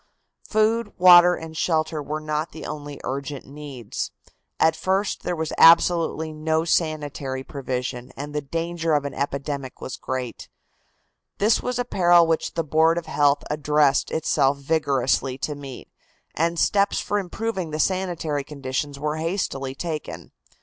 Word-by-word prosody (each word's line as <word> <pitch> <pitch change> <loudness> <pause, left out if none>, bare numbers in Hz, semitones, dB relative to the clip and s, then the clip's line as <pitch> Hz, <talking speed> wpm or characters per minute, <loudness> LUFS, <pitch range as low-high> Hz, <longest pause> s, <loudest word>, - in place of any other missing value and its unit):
Food, 215 0 +1
water 180 -1 +8
and 160 -1 -9
shelter 160 -1 0
were 150 +2 -4
not 155 +1 -3
the 160 - -8
only 145 -1 -7
urgent 140 +1 -4
needs. 140 -5 -6 0.5
At 160 0 +4
first 190 +2 -1
there 175 - -2
was 160 -1 -3
absolutely 165 -1 +5
no 160 +1 0
sanitary 145 -5 -1
provision, 125 -2 -4
and 145 +2 -6
the 150 - -1
danger 165 +2 -2
of 145 -1 0
an 140 - -4
epidemic 140 -1 -4
was 130 - -6
great. 130 -2 -5 0.9
This 215 +2 +3
was 250 -1 -2
a 245 - -1
peril 175 -5 +5
which 165 -1 -1
the 165 - 0
Board 160 +2 +3
of 170 - -3
Health 145 -1 +2
addressed 150 -2 +2
itself 140 -3 +1
vigorously 135 -3 0
to 150 +2 -3
meet, 140 -3 -9 0.5
and 170 +2 0
steps 200 +3 +2
for 205 - -1
improving 190 -1 -3
the 155 - -4
sanitary 170 -5 -1
conditions 140 0 -4
were 150 +2 -2
hastily 155 -6 -2
taken. 150 - -5
155 Hz, 145 wpm, -24 LUFS, 140-170 Hz, 0.9 s, water